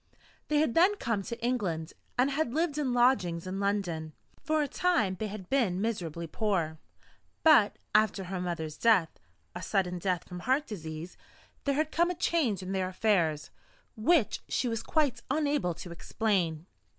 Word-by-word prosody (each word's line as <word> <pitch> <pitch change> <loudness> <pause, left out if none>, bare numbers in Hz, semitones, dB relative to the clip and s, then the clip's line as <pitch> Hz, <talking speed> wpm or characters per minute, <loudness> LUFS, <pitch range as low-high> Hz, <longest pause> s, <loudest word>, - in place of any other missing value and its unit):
They 300 - +1
had 295 -6 +2
then 370 +5 +5
come 230 - -1
to 235 +4 -6
England, 180 -10 -1 0.2
and 260 +3 +3
had 280 -3 -1
lived 315 -2 0
in 270 -4 0
lodgings 240 -9 +2
in 185 +1 -4
London. 180 -6 -1 0.3
For 310 -1 +1
a - - -2
time 330 - +1
they 220 - -2
had 200 -3 -8
been 220 -9 +1
miserably 175 -7 -2
poor. 165 -4 -1 0.6
But, 295 -10 +6 0.2
after 210 -2 +3
her 185 0 -4
mother's 160 -4 -4
death 205 -8 +3 0.3
a - - -6
sudden 180 -3 0
death 180 -1 -1
from 180 -1 -7
heart 265 +10 +1
disease 160 - -7 0.5
there 280 -1 +1
had 310 +1 0
come 345 +2 +2
a 360 - -2
change 300 - 0
in 185 - -5
their 190 -1 0
affairs, 175 -7 +1 0.4
which 260 +2 +2
she 255 - 0
was 225 -2 -1
quite 285 -7 0
unable 285 - 0
to 175 - -9
explain. 170 -3 -1
210 Hz, 165 wpm, -30 LUFS, 180-275 Hz, 0.6 s, But